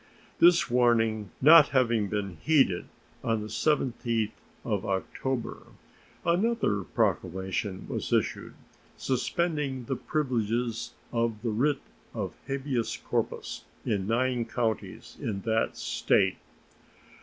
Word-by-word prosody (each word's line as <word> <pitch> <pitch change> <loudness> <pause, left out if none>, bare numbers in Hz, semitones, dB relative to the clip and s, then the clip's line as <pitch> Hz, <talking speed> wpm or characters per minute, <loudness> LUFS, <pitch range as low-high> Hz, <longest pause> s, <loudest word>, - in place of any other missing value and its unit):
This 175 0 +6
warning 115 -4 +2
not 155 +1 +9
having 115 -5 +2
been 100 -4 -3
heeded, 135 - +3 0.4
on 115 -1 0
the 105 - -5
17th 115 -4 0 0.3
of 105 -4 -1
October 115 +6 -3 0.6
another 180 - +2
proclamation 95 -1 -1
was - - -4
issued, - - 0 0.4
suspending 140 -1 -1
the 135 - -2
privileges 120 -5 -1 0.2
of 115 -2 -1
the 115 - 0
writ 135 +6 +1 0.3
of - - -3
habeas 135 -3 -2
corpus - - -3 0.2
in 100 -2 0
nine 120 +1 +1
counties 115 -2 -3
in 100 -3 -3
that 110 +1 0
State. 95 -2 +1
115 Hz, 105 wpm, -28 LUFS, 105-135 Hz, 0.6 s, not